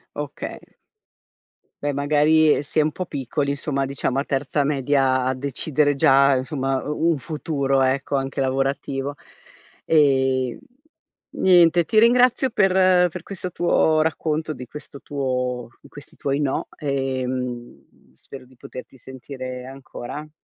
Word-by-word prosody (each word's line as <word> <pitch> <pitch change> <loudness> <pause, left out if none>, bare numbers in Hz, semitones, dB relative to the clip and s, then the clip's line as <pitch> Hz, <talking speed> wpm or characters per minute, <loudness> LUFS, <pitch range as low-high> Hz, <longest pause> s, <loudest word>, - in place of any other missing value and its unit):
Okay. - - -6 1.2
Beh, 145 0 -1
magari 150 +2 +3
si 145 +2 -2
è - - +6
un 155 +1 +1
po' 185 - -5
piccoli 140 -1 -2
insomma, 140 -1 -2
diciamo 135 -1 -2
a 140 - -2
terza 140 +1 -1
media 135 -2 +1
decidere 140 +2 0
già 135 0 +5
insomma 135 0 -2
u 150 +3 -1
un 160 - 0
futuro 140 -2 -1
ecco, 135 +1 +1
anche 135 0 -3
lavorativo. 135 +1 -1 0.7
E 130 -4 +2 0.7
niente, 175 -2 +4
ti 215 - -1
ringrazio 250 +2 +4
per 185 -3 +4
per 175 0 -8
questo 185 -2 -6
tuo 160 -3 +2
racconto, 155 0 -1
di 130 -4 -7
questo 140 0 -10
tuo 125 -3 -3
di - - -16
questi 145 +1 -14
tuoi 140 +1 -1
"no", 140 -2 -1
ehm, 130 - -4
spero 130 - -12
di 130 0 -22
poterti 130 +1 -11
sentire 130 0 -8
ancora. 135 +2 -8
140 Hz, 130 wpm, -22 LUFS, 130-155 Hz, 1.2 s, è